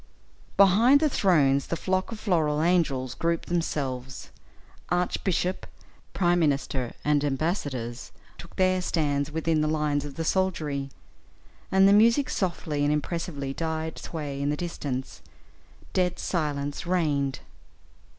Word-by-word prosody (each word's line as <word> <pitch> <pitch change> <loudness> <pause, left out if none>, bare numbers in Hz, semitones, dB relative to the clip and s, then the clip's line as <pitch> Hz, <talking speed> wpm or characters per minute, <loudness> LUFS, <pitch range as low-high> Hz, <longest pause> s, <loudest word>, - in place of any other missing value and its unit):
Behind 220 +8 +6
the 310 - +3
thrones 140 - +3
the - - -1
flock 185 +4 -1
of 225 - -6
floral 160 -8 +1
angels 145 -8 +1
grouped 170 +2 -2
themselves; 135 -6 -3 0.6
archbishop, 180 +1 -1 0.4
prime 175 -1 +2
minister, 135 -5 0
and 145 -1 +2
embassadors, 135 - -2 0.3
took 170 - -12
their 185 0 +2
stand 145 -5 0
within 160 0 0
the 155 - +1
lines 150 -2 0
of 145 -2 -8
the 165 - -3
soldiery, 155 -7 -1 0.8
and 190 0 +6
the 200 - +6
music 230 +6 +4
softly 160 -6 -1
and 145 - +2
impressively 150 -2 -3
died 160 +1 -3
sway 145 -4 -5
in 140 - 0
the 150 - -1
distance; 140 -6 -5 0.7
dead 180 -1 +1
silence 145 -2 -2
reigned. 145 -7 0
160 Hz, 125 wpm, -26 LUFS, 140-180 Hz, 0.8 s, Behind